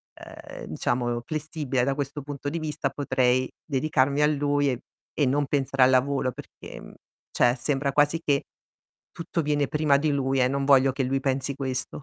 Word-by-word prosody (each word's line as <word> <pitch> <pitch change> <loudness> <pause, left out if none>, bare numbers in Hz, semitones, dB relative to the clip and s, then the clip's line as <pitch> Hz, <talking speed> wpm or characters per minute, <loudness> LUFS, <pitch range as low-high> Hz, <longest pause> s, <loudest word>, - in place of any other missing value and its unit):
ehm, - - -10
diciamo, 120 -1 -1
flessibile, 150 -4 -2
da 135 +1 +1
questo 145 +1 -4
punto 145 0 -7
di 165 +2 -3
vista, 155 -1 -2
potrei 130 -2 +1
dedicarmi 140 -1 +1
a 150 - +5
lui 145 -1 +1
e 125 - -4 0.3
e 145 - +1
non 140 +3 +1
pensare 135 -1 +1
al 125 - +6
lavoro 130 0 +2
perché, - - -11
mhmm, - - -12 0.4
cioè 120 +1 +3
sembra 140 +2 -1
quasi 145 +4 +2
che 140 -1 +1 0.7
tutto 170 0 -3
viene 145 -1 +1
prima 150 -1 +2
di 150 +2 0
lui 135 -1 0
e 125 - +4
non 140 +1 -1
voglio 135 -1 +5
che 135 +1 -2
lui 135 +1 0
pensi 135 0 -1
questo. 130 -2 -3
140 Hz, 180 wpm, -26 LUFS, 130-145 Hz, 0.7 s, al